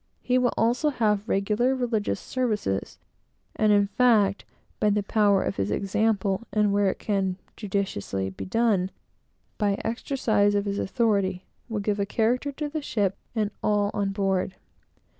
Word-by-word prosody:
He 255 0 +2
will 245 -1 +2
also 245 +7 +2
have 215 -5 0
regular 215 +6 +1
religious 230 -6 -1
services; 215 - -2 0.6
and, 215 -1 +3
in 205 -1 +5
fact, 205 -2 +3 0.3
by 210 - +3
the 205 0 +1
power 205 -2 +3
of 100 - -3
his 100 0 -1
example, 200 - 0
and, 210 -1 +2
where 200 -1 +3
it - - -3
can 195 -3 -1 0.2
judiciously 185 - -2
be 95 - -7
done, 205 -3 +1 0.7
by 205 -2 +2
the - - -9
exercise 220 -3 +1
of 200 0 +1
his 200 0 -2
authority, 200 -5 0 0.2
will 220 -2 -2
give 205 0 -1
a 200 - 0
character 245 +6 +1
to 295 +2 -4
the 310 +1 -4
ship 205 -8 0 0.2
and 215 -2 0
all 205 -1 +1
on 200 -1 0
board. 195 -1 -1
205 Hz, 160 wpm, -26 LUFS, 195-230 Hz, 0.7 s, in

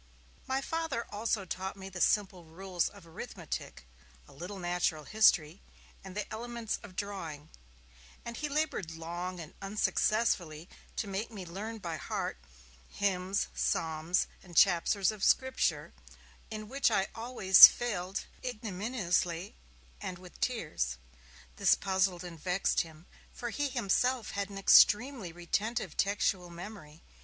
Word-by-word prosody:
My 265 +1 0
father 320 -6 -2
also 210 -1 -1
taught 190 +2 -4
me 190 0 -8
the 185 -2 -6
simple 190 -4 +2
rules 180 +2 -2
of 200 -4 -15
arithmetic, 160 - -7 0.4
a - - -16
little 180 +7 -7
natural 175 -3 -1
history, 175 -3 +3 0.4
and 190 0 -9
the 210 - -1
elements 235 0 -4
of 185 - -12
drawing; 165 -8 -5 0.8
and 235 - -5
he 295 +3 -3
laboured 285 - -1
long 175 +2 -5
and 160 -3 -9
unsuccessfully 195 -5 0 0.3
to 215 - -2
make 200 +3 -3
me 200 -5 -8
learn 205 +6 -6
by 170 -6 -4
heart 65 - -3 0.5
hymns, 190 -1 -1
psalms 160 +2 0 0.2
and 175 -4 -10
chapters 195 +2 +4
of 210 -2 -8
Scripture, 260 0 +2 0.6
in 215 -1 -6
which 275 +3 +2
I 195 -4 +2
always 225 -5 +9
failed 200 -5 -3 0.2
ignominiously 200 -6 -2 0.5
and 180 - -5
with 180 0 -14
tears. 150 - -1 0.6
This - - +5
puzzled 190 -2 0
and 170 -2 -9
vexed 180 +4 +1
him, 160 0 -11 0.3
for 240 -1 -4
he 290 +4 -1
himself 245 0 +1
had 200 0 -3
an 200 - -8
extremely 210 +1 +5
retentive 195 +4 -2
textual 195 -2 0
memory. 170 -3 -10
195 Hz, 130 wpm, -31 LUFS, 175-220 Hz, 0.8 s, always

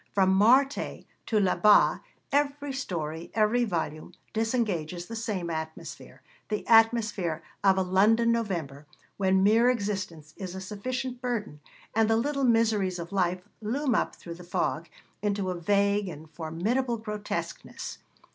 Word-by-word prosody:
From 190 -1 +4
Marthe 255 +8 +3 0.2
to 220 - +2
Là 190 -3 +2
Bas 210 -1 +6 0.3
every 285 0 0
story, 165 - -4
every 225 +3 +3
volume, 160 -6 -3 0.2
disengages 205 -8 -1
the 230 - -7
same 200 -7 -3
atmosphere 160 0 -7 0.3
the 210 -1 -2
atmosphere 220 -8 +3 0.2
of 190 -1 +5
a 190 - +2
London 215 +6 +3
November, 170 -11 -3 0.3
when 190 -1 +3
mere 225 +4 +5
existence 190 -9 -3
is 185 -2 -6
a - - -5
sufficient 245 +6 -4
burden, 225 -11 -3 0.3
and 225 0 +3
the 225 - +4
little 275 +3 0
miseries 220 -6 +2
of 170 0 -7
life 180 -2 0 0.2
loom 255 +5 0
up - - 0
through 170 - -9
the 175 +1 -11
fog 175 - -2 0.3
into 200 -2 -1
a 175 -1 -5
vague 200 +2 +2
and 155 -2 -9
formidable 200 - -1
grotesqueness. 210 -1 -5
205 Hz, 140 wpm, -28 LUFS, 175-230 Hz, 0.3 s, Bas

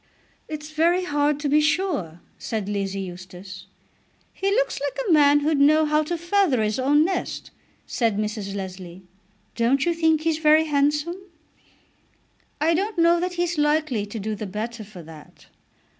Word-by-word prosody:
"It's 305 0 -7
very 340 +4 +2
hard 290 -3 0
to 295 - -1
be 300 +2 +4
sure," 300 - -1 0.2
said 220 -4 -4
Lizzie 195 -1 -2
Eustace. 185 +1 -10 0.7
"He 390 - -1
looks - - 0
like 285 -1 -3
a - - +2
man 290 -2 +5
who'd 300 0 +1
know 310 +2 +5
how 300 0 +2
to 335 +3 -3
feather 345 - +1
his 215 +3 -1
own 290 +4 +3
nest," 370 0 -3 0.3
said 225 -4 -1
Mrs. 210 -2 -3
Leslie. 185 -2 -7 0.5
"Don't 250 +4 +2
you 345 - +2
think 320 -2 +2
he's 320 -1 0
very 310 0 +5
handsome?" 295 +3 0 1.4
"I 320 +3 +2
don't 395 +4 -1
know 340 0 +4
that 360 +1 -2
he's 350 -2 -1
likely 295 -8 +1
to 205 - -7
do 215 +2 -3
the 210 0 -5
better 220 +3 -5
for 195 -4 -12
that." 155 -1 -15
290 Hz, 160 wpm, -23 LUFS, 210-320 Hz, 1.4 s, man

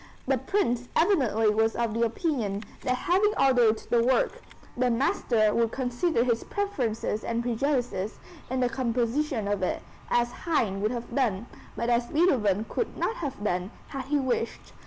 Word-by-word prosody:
The 265 -1 +1
Prince 250 - 0
evidently 245 - +3
was 225 +1 +2
of 235 -2 0
the 230 - -1
opinion 230 - -1 0.2
that 255 - 0
having 385 +10 +2
ordered 245 -5 +4
the 235 -1 +4
work, 260 - +1 0.3
the 250 0 +2
master 230 -3 +2
would 230 -1 +2
consider 250 +2 0
his 235 -2 0
preferences 245 - -2
and 235 0 -1
prejudices 240 -5 -1 0.3
in 260 0 -1
the 250 - +3
composition 245 -1 -1
of 205 -1 -1
it, 185 - -1 0.3
as 240 0 +2
Haydn 225 - -1
would 215 - +1
have 240 -1 -5
done, 235 -6 0 0.3
but 235 +1 -1
as 240 0 +2
Beethoven 225 - +2
could 465 - -3
not 455 - -1
have 275 - -5
done, 180 -2 -1 0.2
had 270 -3 -5
he 290 +2 +1
wished. 255 -4 -2
240 Hz, 160 wpm, -27 LUFS, 225-270 Hz, 0.3 s, ordered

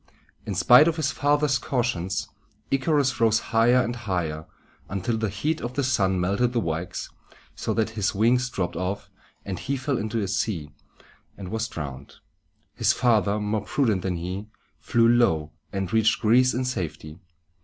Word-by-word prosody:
In 100 - -2
spite 125 - +7
of 165 - +1
his 155 -3 0
father's 145 0 +2
cautions, 95 -8 -1 0.4
Icarus 135 -1 +1
rose 110 -1 +4 0.2
higher 120 +3 +5
and 120 +1 -3
higher, 85 -9 -3 0.4
until 100 +4 -1
the 110 -1 -1
heat 150 - -2
of 120 +1 -5
the 140 - 0
sun 95 -7 +1
melted 100 +7 +1
the 120 - +2
wax, 85 -3 -4 0.4
so - - -3
that 110 -1 0
his 105 -2 -1
wings 125 +4 +2
dropped 90 -6 -3
off, 95 +4 -4 0.3
and 95 -2 -4
he 140 +1 -2
fell 130 0 -1
into 110 +2 -2
the 100 - -1
sea 90 -6 -2 0.7
and 95 -2 -7
was 110 +2 -2
drowned. 70 -3 -7 0.6
His - - +2
father, 105 -4 +2
more 105 0 -1
prudent 110 -9 +1
than 90 -1 -2
he, 90 +5 -5 0.3
flew 115 -2 +2
low, 80 -11 +3 0.2
and 95 -1 -3
reached 110 0 +3
Greece 125 +3 +4
in 130 +1 -1
safety. 85 -8 -5
110 Hz, 165 wpm, -25 LUFS, 95-125 Hz, 0.7 s, spite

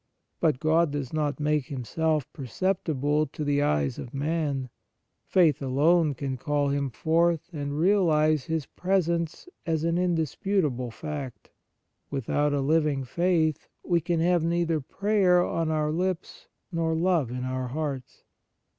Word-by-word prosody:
But 155 -6 +2
God 160 +2 +3
does 140 -2 -4
not 150 -2 -1
make 150 -2 0
Him 130 -3 -5
self 155 0 0
perceptible 150 - -1
to 150 - -6
the 145 0 +1
eyes 75 - 0
of 125 - -8
man; 140 -3 -1 0.6
faith 165 -7 +3
alone 150 +3 +3
can 130 0 -3
call 145 +2 0
Him 140 -1 -1
forth 165 +5 +1
and 145 -1 -4
realize 155 -5 +3
His 160 -3 -2
presence 170 - -1 0.2
as 160 -2 -1
an 165 +1 +1
indis 170 -5 0
putable 150 - 0
fact. 145 -1 -7 0.6
Without 145 +2 0
a 145 -1 0
living 150 -1 +1
faith 160 +2 0 0.2
we 170 -2 +1
can 170 +1 -1
have 175 -1 +2
neither 170 -1 +1
prayer 190 +2 +2
on 165 -1 -1
our 155 -1 0
lips 180 +2 -3 0.2
nor 165 -1 0
love 165 -6 +1
in 125 +1 -4
our 130 0 -2
hearts. 140 -1 -5
155 Hz, 145 wpm, -27 LUFS, 140-170 Hz, 0.6 s, God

